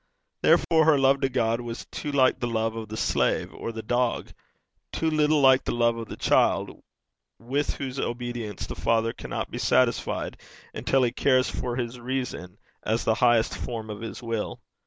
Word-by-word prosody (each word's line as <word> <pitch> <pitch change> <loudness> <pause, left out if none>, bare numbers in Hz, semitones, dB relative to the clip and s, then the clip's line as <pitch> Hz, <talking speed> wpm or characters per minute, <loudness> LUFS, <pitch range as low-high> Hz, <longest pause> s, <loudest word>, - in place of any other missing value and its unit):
Therefore 160 -2 +4
her 155 -2 +5
love 135 0 +3
to 135 - +2
God 115 -2 0
was 120 0 -6
too 150 - -4
like 130 -2 +3
the 120 - -1
love 115 -1 -1
of 110 -2 -6
the 110 - -5
slave - - 0
or - - -5
the 110 -1 -7
dog; 120 +1 0 0.6
too 160 -1 -1
little 155 0 +3
like 130 -1 +6
the - - -2
love 120 -1 +2
of 115 -1 -6
the - - -8
child, - - +1 0.6
with 135 +5 -2
whose 135 -1 -5
obedience 120 -5 -4
the - - -6
Father 115 0 +1
cannot - - -5
be - - -5
satisfied - - +1 0.3
until 135 -1 +1
he 120 - +2
cares 130 +1 +2
for 120 -1 -3
his 120 0 -4
reason 120 -7 -4 0.2
as 110 +2 -1
the 110 - +2
highest 120 0 +3
form 110 -3 -5
of 105 - -7
his 115 +2 -7
will. 115 -2 -3
120 Hz, 180 wpm, -26 LUFS, 115-130 Hz, 0.6 s, like